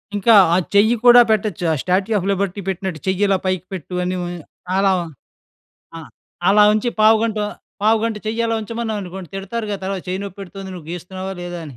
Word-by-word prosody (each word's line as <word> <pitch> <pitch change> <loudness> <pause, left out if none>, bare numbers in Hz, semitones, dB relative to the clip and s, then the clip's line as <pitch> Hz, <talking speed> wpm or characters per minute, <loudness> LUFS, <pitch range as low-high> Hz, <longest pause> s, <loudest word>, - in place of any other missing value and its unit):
ఇంకా, 215 +3 +4 0.2
ఆ - - +4 0.2
చెయ్యి 215 +4 +5
కూడా 245 0 +9
పెట్టొచ్చు, 210 -4 -1
ఆ - - +2
స్టాట్యూ 190 +4 0
ఆఫ్ 190 - -2
లిబర్టీ 200 0 -2
పెట్టినట్టు, 190 -3 -3
చెయ్యిలా 195 +1 +2
పైకి 185 -1 -1
పెట్టు 180 0 -6
అని 180 +1 -2 0.6
ఆహ్, - - +2
అలా 195 0 +3 1.1
ఆహ్, 160 - -11 0.4
అలా 210 +1 +6
ఉంచి 215 +3 0
పావుగంట, 220 0 +4 0.4
పావుగంట 220 +1 +2
చెయ్య 230 +2 0
అలా 225 0 0
ఉంచమన్నామనుకోండి, 210 -5 -5
తిడతారు 205 +4 -4
గాద! 200 -2 -4
"అలా 195 - -2
చెయ్యి 185 +1 -2
నొప్పెడుతొంది, 195 0 -9
నువ్వు 165 -4 -10
గీస్తున్నావా? 185 +2 -6
లేదా?" 175 0 -6
అని. 135 - -11
195 Hz, 170 wpm, -20 LUFS, 185-215 Hz, 1.1 s, కూడా